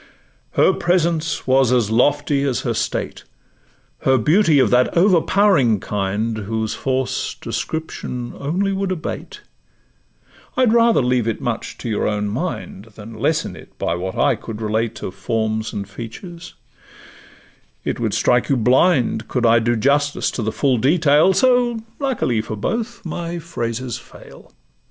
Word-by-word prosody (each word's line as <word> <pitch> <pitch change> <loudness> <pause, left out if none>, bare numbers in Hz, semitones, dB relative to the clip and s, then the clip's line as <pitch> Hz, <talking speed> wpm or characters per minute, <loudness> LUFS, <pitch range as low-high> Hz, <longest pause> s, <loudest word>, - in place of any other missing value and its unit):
Her 190 - +4
presence 170 -3 0
was 130 -1 +3
as 120 -4 +2
lofty 145 +4 +2
as 135 -3 0
her - - -1
state; - - -3 0.8
Her 130 0 +3
beauty 160 - +3
of 130 - +3
that 125 +6 +3
overpowering 175 - +4
kind, 105 +3 -2
Whose 110 +1 -2
force 130 -1 -2
description 125 -6 -4
only 180 +8 -1
would 195 0 -2
abate: 175 -3 -5 1.2
I'd 250 -3 +4
rather 230 - +4
leave 125 -2 +1
it 115 - -1
much 120 -4 -4
to - - -7
your 110 -2 0
own 105 -1 -1
mind, 115 - -4
Than 110 +2 -10
lessen 150 +8 -1
it - - -15
by - - -1
what 95 +2 -4
I 145 - +3
could 110 0 -8
relate 110 +1 -2
Of 90 - -4
forms 110 +2 -2
and 100 -1 -5
features; 125 - -9 1.3
it - - -3
would - - -1
strike 125 -1 +2
you 135 - +3
blind 125 -1 +2
Could 125 -2 -1
I 115 0 +5
do 120 +1 +1
justice 145 +5 +1
to - - -4
the 110 0 -1
full 130 +3 +1
detail; 150 +5 +4
So, 245 0 +3 0.2
luckily 250 - 0
for 110 0 -6
both, 225 - -3
my 170 +1 -4
phrases 125 -7 -4
fail. - - -15
130 Hz, 145 wpm, -20 LUFS, 110-170 Hz, 1.3 s, I